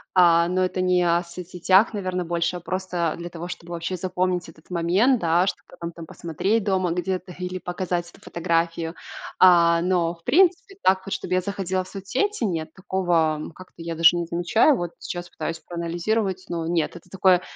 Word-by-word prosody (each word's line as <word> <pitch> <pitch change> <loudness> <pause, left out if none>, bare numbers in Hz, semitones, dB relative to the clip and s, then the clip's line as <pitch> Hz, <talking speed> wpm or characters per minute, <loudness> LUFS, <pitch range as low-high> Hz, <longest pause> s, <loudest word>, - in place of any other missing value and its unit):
А, 170 -1 +6
но 185 +1 +1
это 185 0 -1
не 180 -1 +3
о 170 0 +3
соцсетях, 180 +4 +2
наверно, 185 -3 -2
больше, 170 +1 -1
а - - -4
просто 180 -2 -2
для 170 0 -6
того, 170 +1 -7
чтобы 175 -1 -8
вообще 170 +2 -3
запомнить 180 -1 -1
этот 155 +1 -18
момент, 185 +9 +2
да, 170 +2 +3
что, - - -1
кто - - -16
там 170 0 -4
там 165 -1 -10
посмотреть 190 +8 -1
дома 185 -4 +1
где-то 180 0 -3
или 180 0 -4
показать 175 -1 -3
эту - - -19
фотографию. 165 -1 -1 0.4
А, 170 -2 +6
но, 175 -2 +1
в 165 - -27
принципе, 375 +2 +3
так 190 0 +3
вот 195 - -4
чтобы - - -3
я 185 - +2
заходила 190 -1 -2
в - - -14
соцсети- 245 - -2
нет, 160 -4 -3
такого, 175 -5 +1
м, 155 - -6
как-то 185 0 -14
я 165 0 -4
даже 165 +1 +6
не 170 -1 -1
замечаю. 175 - +3
Вот 175 -1 -3
сейчас 175 0 -6
пытаюсь 165 +1 -4
проанализировать, 175 +4 -2
но 165 -1 -2
нет. 165 -2 0
Это 180 - -13
такое 185 -1 +4
180 Hz, 190 wpm, -24 LUFS, 170-185 Hz, 0.4 s, А